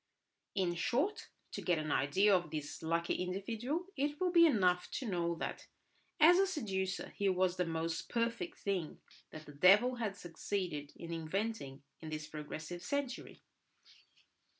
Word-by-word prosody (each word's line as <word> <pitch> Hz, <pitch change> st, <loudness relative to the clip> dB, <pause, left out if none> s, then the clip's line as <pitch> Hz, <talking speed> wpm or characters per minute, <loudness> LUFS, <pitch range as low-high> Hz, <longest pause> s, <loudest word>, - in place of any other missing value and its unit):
In 185 Hz, -3 st, +1 dB
short, 270 Hz, -, 0 dB, 0.2 s
to -, -, -5 dB
get 175 Hz, -2 st, +2 dB
an 155 Hz, -1 st, -2 dB
idea 190 Hz, +11 st, +4 dB
of 175 Hz, -3 st, 0 dB
this 150 Hz, -1 st, -5 dB
lucky 165 Hz, +1 st, 0 dB
individual, 225 Hz, -, -2 dB
it 290 Hz, +2 st, -1 dB
will 365 Hz, -1 st, +1 dB
be 340 Hz, -1 st, +7 dB
enough 185 Hz, -, +2 dB
to 260 Hz, -, -3 dB
know 170 Hz, -3 st, 0 dB
that -, -, -5 dB, 0.5 s
as 345 Hz, +4 st, +8 dB
a 390 Hz, -, +4 dB
seducer 195 Hz, -, -2 dB
he 200 Hz, -1 st, +1 dB
was 185 Hz, -1 st, +2 dB
the 180 Hz, -1 st, 0 dB
most 165 Hz, 0 st, -2 dB
perfect 235 Hz, +9 st, -1 dB
thing 185 Hz, -6 st, -2 dB, 0.3 s
that 155 Hz, 0 st, -10 dB
the -, -, -10 dB
devil 205 Hz, -, +5 dB
had 210 Hz, -4 st, -2 dB
succeeded 170 Hz, -4 st, -4 dB
in 170 Hz, 0 st, -7 dB
inventing 165 Hz, -4 st, -3 dB, 0.2 s
in 160 Hz, -, -7 dB
this 155 Hz, 0 st, -4 dB
progressive 155 Hz, +3 st, -6 dB
century. 280 Hz, 0 st, -4 dB
185 Hz, 150 wpm, -35 LUFS, 165-235 Hz, 0.5 s, as